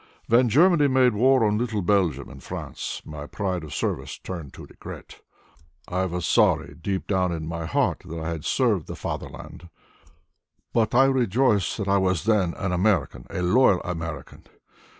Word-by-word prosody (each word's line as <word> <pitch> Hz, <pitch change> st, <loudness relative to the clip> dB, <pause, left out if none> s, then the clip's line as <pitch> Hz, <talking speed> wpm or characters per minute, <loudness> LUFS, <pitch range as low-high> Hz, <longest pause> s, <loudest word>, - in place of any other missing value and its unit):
"When 120 Hz, +1 st, +4 dB
Germany 155 Hz, -, +5 dB
made 130 Hz, -2 st, +3 dB
war 130 Hz, +2 st, +4 dB
on 105 Hz, 0 st, +1 dB
little 110 Hz, -5 st, -2 dB
Belgium 85 Hz, -9 st, +1 dB
and -, -, -12 dB
France -, -, -6 dB
my 75 Hz, -1 st, -8 dB
pride 95 Hz, -3 st, -3 dB
of 75 Hz, -, -9 dB
service -, -, -3 dB
turned 85 Hz, -7 st, -7 dB
to -, -, -10 dB
regret. -, -, -11 dB, 0.7 s
I 95 Hz, +1 st, -1 dB
was 90 Hz, -1 st, -3 dB
sorry -, -, +2 dB
deep 95 Hz, +2 st, -2 dB
down 95 Hz, -3 st, 0 dB
in 80 Hz, -2 st, -4 dB
my 85 Hz, 0 st, -4 dB
heart -, -, 0 dB
that 85 Hz, +1 st, -6 dB
I 80 Hz, +1 st, -4 dB
had 80 Hz, -2 st, -5 dB
served 110 Hz, -, +1 dB
the -, -, -6 dB
Fatherland, 85 Hz, -, -7 dB, 1.0 s
but 115 Hz, 0 st, +1 dB
I 135 Hz, +2 st, +6 dB
rejoiced 125 Hz, -5 st, +2 dB
that 100 Hz, -3 st, -3 dB
I 100 Hz, 0 st, +3 dB
was 95 Hz, -4 st, 0 dB
then 100 Hz, -5 st, +1 dB
an 95 Hz, -1 st, -3 dB
American, 90 Hz, -, 0 dB
a 90 Hz, -, -3 dB
loyal 100 Hz, 0 st, +4 dB
American. 80 Hz, -2 st, -6 dB
95 Hz, 170 wpm, -24 LUFS, 85-115 Hz, 1.0 s, I